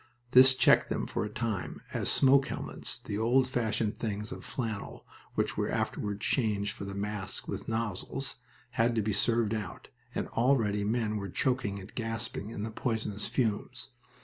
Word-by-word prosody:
This 130 0 +8
checked - - +5
them - - -1
for - - -2
a 105 - -3
time, 110 -3 -3
as - - 0
smoke 135 0 +5
helmets - - -2
the 105 - -4
old 125 +3 +4
fashioned 115 -4 0
things 105 -1 -3
of - - -7
flannel 110 -5 -4 0.3
which - - 0
were - - 0
afterward 105 -1 -1
changed 105 -4 +1
for 100 - -6
the 100 0 -5
masks 100 -1 -2
with - - -5
nozzles 115 +4 -2 0.3
had 115 0 +2
to 110 - +2
be 105 0 0
served 115 +1 +2
out, 105 -5 -5 0.3
and - - -1
already 115 -5 +2
men 110 0 0
were 100 -1 -4
choking 125 -1 0
and 95 - -11
gasping 115 -2 -3
in 105 -2 -5
the 110 - -3
poisonous 110 -3 -2
fumes. 120 +2 -1
110 Hz, 170 wpm, -30 LUFS, 105-120 Hz, 0.3 s, This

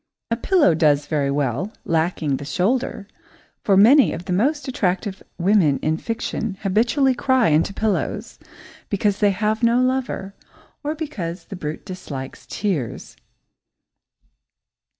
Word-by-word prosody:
A - - +3
pillow 295 - +3
does 150 -2 +3
very 145 -2 0
well, 140 - -1
lacking 160 -4 0
the 145 - -7
shoulder, 200 - -1 0.6
for 195 -2 +3
many 250 +8 +6
of 175 - -6
the 185 - -2
most 285 - +1
attractive 190 -4 -1 0.2
women 175 -6 +3
in 155 +1 +1
fiction 225 -1 -3
habitually 235 +7 +2
cry 255 -3 +2
into 155 +5 +2
pillows 215 +1 -2 0.5
because 200 0 0
they 205 - +4
have 210 +3 0
no 235 +1 +4
lover, 255 -6 -1 0.5
or 300 +2 -2
because 185 - -5
the 195 - -8
brute 155 -3 -6
dislikes 145 -9 -7
tears. 170 - -3
195 Hz, 130 wpm, -22 LUFS, 160-235 Hz, 0.6 s, many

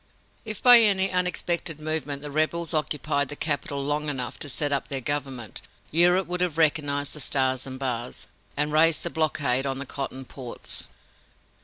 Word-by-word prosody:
If, 215 -3 -5
by 245 -1 +9
any 195 -3 +3
unexpected 180 -3 0
movement, 150 -2 -3
the 145 - -6
rebels 155 +2 0
occupied 145 -2 0
the 145 - -4
capital 145 -2 -1
long 150 +1 -1
enough 130 -4 -3
to 145 - -4
set 145 +2 0
up 140 -2 0
their 135 - -2
government, 135 -5 -4 0.3
Europe 180 +3 +5
would 180 +1 -4
have 175 -3 0
recognized 145 -3 +1
the 150 - -8
stars 130 -2 0
and 130 0 -7
bars, 125 -2 -4 0.3
and 150 +1 0
raised 160 +1 +4
the 170 - -3
blockade 140 -4 +1
on 135 -1 -2
the 140 - -5
cotton 135 -1 -5
ports. 125 -2 -4
145 Hz, 170 wpm, -25 LUFS, 135-165 Hz, 0.3 s, by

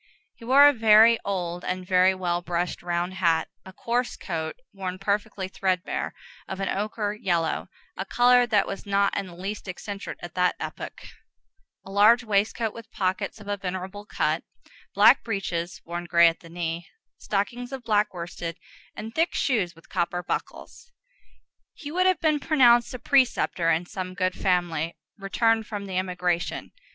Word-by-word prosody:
He - - -17
wore 275 +4 +8
a 290 - +5
very 225 0 +6
old 180 -3 -3
and 185 0 -3
very 185 0 +4
well 175 -2 -1
brushed 175 0 -2
round 175 +1 -2
hat; 165 -4 +1
a 190 - -11
coarse 240 +5 -2
coat, 160 -3 -4 0.2
worn 185 -2 -5
perfectly 200 0 -2
threadbare, 185 -1 -2 0.3
of 190 - -6
an 195 - -1
ochre 210 +1 -2
yellow, 175 -7 -1 0.3
a - - -3
color 245 0 +5
that 210 -4 +3
was 195 +1 -7
not 200 0 +2
in 195 - -2
the 175 - -11
least 195 +4 -6
eccentric 195 +2 -6
at 175 - -7
that 180 -1 +2
epoch; - - -7 0.8
a 195 - -10
large 215 +4 +5
waistcoat 215 +1 0
with 230 -1 -11
pockets 190 +3 -2
of 210 - -12
a 205 0 -1
venerable 190 +1 -5
cut; - - 0 0.5
black - - +6
breeches, 185 -5 -3
worn 175 +1 -5
gray 170 -1 +6
at 165 - 0
the 165 - -14
knee, 170 0 -4 0.3
stockings 240 +5 -2
of 265 -2 -6
black 210 -2 +2
worsted; 170 -1 -6 0.4
and 220 +1 -7
thick 330 +5 +1
shoes 205 -10 0
with 165 - -19
copper 175 -1 -2
buckles. 470 - -6 0.8
He 290 -3 -8
would 365 +3 +2
have 370 -3 +3
been 310 -2 +2
pronounced 245 -6 +4
a - - -3
preceptor 245 -10 +2
in 165 +2 +1
some 185 0 -6
good 185 -1 0
family, 175 -4 0 0.2
returned 225 +2 +1
from 205 -2 -5
the 185 -2 -1
emigration. 180 -2 -2
195 Hz, 165 wpm, -26 LUFS, 175-225 Hz, 0.8 s, wore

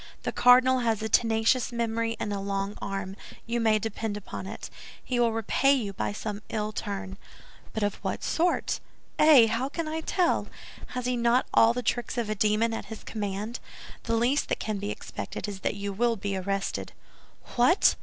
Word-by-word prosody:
The - - -1
cardinal 255 +1 +6
has 225 -3 0
a 220 - -2
tenacious 225 +2 +3
memory 230 -1 -1
and 205 - -2
a 200 - -2
long 195 +1 -2
arm; 195 -1 -4 0.3
you 235 +1 -1
may 220 -2 +4
depend 215 0 -3
upon 210 - -7
it, - - -7 0.3
he 250 -1 -1
will 235 -1 +4
repay 225 +5 +2
you 220 -8 -1
by 190 - -2
some 210 0 -5
ill 215 -1 -2
turn." 200 -2 -5 0.5
"But 220 - -2
of 205 -1 0
what - - -3
sort?" 345 +2 +1 0.4
"Eh! 300 -6 +8
How 230 +4 -1
can 330 +2 -3
I 320 +1 -2
tell? 355 +1 +1 0.5
Has 250 - -2
he 250 0 +1
not 235 +1 +3
all 230 +1 +6
the 250 +1 -3
tricks 240 +2 -1
of 225 -3 -1
a - - +2
demon 215 +2 +2
at - - -4
his 220 - -9
command? 210 +2 -4 0.5
The 230 - +1
least 245 +6 +1
that - - +1
can 215 -2 -2
be 205 +1 -3
expected - - -5
is 200 -2 -6
that - - -1
you 200 0 -4
will 235 +3 +2
be 200 -1 -3
arrested." 195 +1 -2 0.6
"What! 285 +11 +5
225 Hz, 190 wpm, -27 LUFS, 205-240 Hz, 0.6 s, Eh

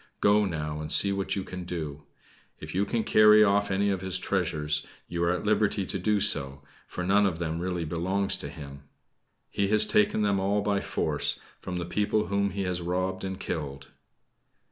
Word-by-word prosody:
Go 105 +1 +4
now, 75 -4 -4
and 75 - -5
see 100 - +5
what 100 -1 -2
you 95 - -3
can 95 -1 -7
do. 80 -4 -6 0.6
If - - -9
you 95 +2 +1
can 115 +2 -1
carry 105 0 +6
off 100 0 +2
any 100 +1 +1
of 95 -2 -2
his 95 -1 0
treasures 75 -4 0 0.2
you 85 0 -3
are 85 - +2
at 90 +3 -2
liberty 105 -1 +1
to 95 - -4
do 105 +3 +1
so 70 -9 +1 0.2
for 90 - -5
none 100 +3 +3
of 85 -4 -3
them 80 -1 -3
really 90 -1 -3
belongs 95 +5 -1
to - - -6
him. 70 -2 -10 0.7
He 100 -1 0
has 105 +1 +7
taken 105 0 +2
them 100 -1 +1
all 100 +2 0
by 100 -1 0
force - - -1 0.2
from 90 - -6
the 85 - -3
people 105 +4 -1
whom 100 0 +1
he 100 +1 -4
has 90 -1 -2
robbed 90 +2 -2
and 95 0 -5
killed." 70 -5 -5
95 Hz, 195 wpm, -27 LUFS, 85-100 Hz, 0.7 s, has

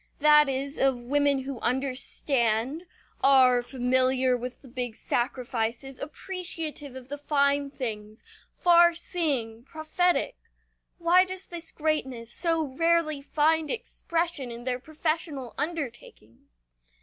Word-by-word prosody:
That 300 -1 +6
is, 275 +2 -3
of 270 -2 +2
women 280 +2 +1
who 270 -2 -6
understand, 260 +1 -1 0.4
are 255 -2 +6
familiar 255 0 +1
with 250 +2 -7
the - - -13
big 245 -2 -4
sacrifices, 245 +1 -2
appreciative 315 -4 -4
of 260 -1 -10
the 290 +2 -6
fine 280 -1 +1
things, 215 -5 -6 0.3
far 345 -1 +5
seeing, 270 -11 -2
prophetic. 345 - 0 0.6
Why 345 +2 +5
does 375 0 -6
this 340 -1 -5
greatness 265 -7 -1
so 330 -2 +2
rarely 310 +1 +1
find 310 +2 +1
expression 335 - -2
in 235 0 -8
their 250 0 -2
professional 310 -3 -3
undertakings? 240 - -7
275 Hz, 115 wpm, -27 LUFS, 250-320 Hz, 0.6 s, That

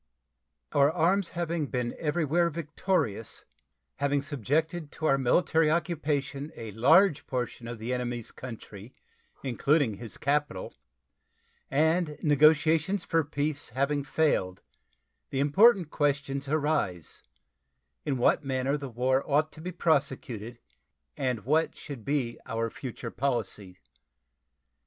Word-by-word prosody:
Our 140 +1 +4
arms 180 +3 +2
having 170 -3 -1
been 125 -3 -2
everywhere 165 +2 +1
victorious, 155 - -2 0.5
having 140 0 +1
subjected 150 +4 -1
to 160 - -5
our 135 -3 +3
military 160 +4 +3
occupation 150 -3 -1
a 110 -2 -7
large 150 - +4
portion 125 -2 -3
of 120 0 -5
the 115 +3 -3
enemy's 120 -2 -3
country, 115 -2 -10 0.5
including 135 -2 +1
his 115 -3 -7
capital, 145 -9 -1 1.0
and 160 +2 +1
negotiations 155 +5 +4
for 165 -1 +2
peace 145 0 -3
having 140 +4 0
failed, 135 -11 0 0.7
the 135 - -2
important 180 +4 +5
questions 140 -1 0
arise, 145 - -1 0.8
in 140 -3 -1
what 125 - +3
manner 135 +1 0
the 140 -2 -6
war 130 +3 +1
ought 150 +2 +2
to 155 - -12
be 180 +3 -4
prosecuted 140 - -1 0.6
and 125 -5 -2
what 155 +5 +2
should 140 -7 -8
be 135 -4 -1
our 115 0 -2
future 120 -2 -7
policy. 110 -8 -2
140 Hz, 115 wpm, -28 LUFS, 125-155 Hz, 1.0 s, important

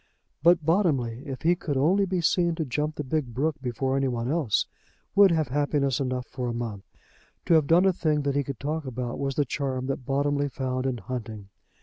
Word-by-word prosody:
But 170 0 +4
Bottomley, 140 - +1
if 130 -2 -6
he 170 +2 +4
could 150 -5 -3
only 190 +8 +3
be 185 -1 0
seen 170 0 +2
to 160 -1 -2
jump 150 +4 -2
the 150 - -3
big 130 -4 -2
brook 150 +3 0
before 130 +1 -1
any 135 0 +1
one 120 0 -2
else, 145 - +1 0.5
would 200 0 +7
have 160 -5 +1
happiness 140 -1 +1
enough 130 -2 -2
for 125 -2 -5
a - - -2
month. 110 -5 -5 0.6
To - - +3
have 155 -3 +4
done 170 +4 +5
a 190 - +4
thing 155 -4 0
that 140 0 0
he 145 - +2
could 135 -3 -6
talk 155 +2 -3
about 125 -1 -4
was 135 -1 -2
the 145 - +2
charm 130 -1 -2
that 135 0 -3
Bottomley 140 +2 0
found 130 0 -2
in 130 -2 -1
hunting. 110 -4 -6
140 Hz, 215 wpm, -26 LUFS, 125-155 Hz, 0.6 s, would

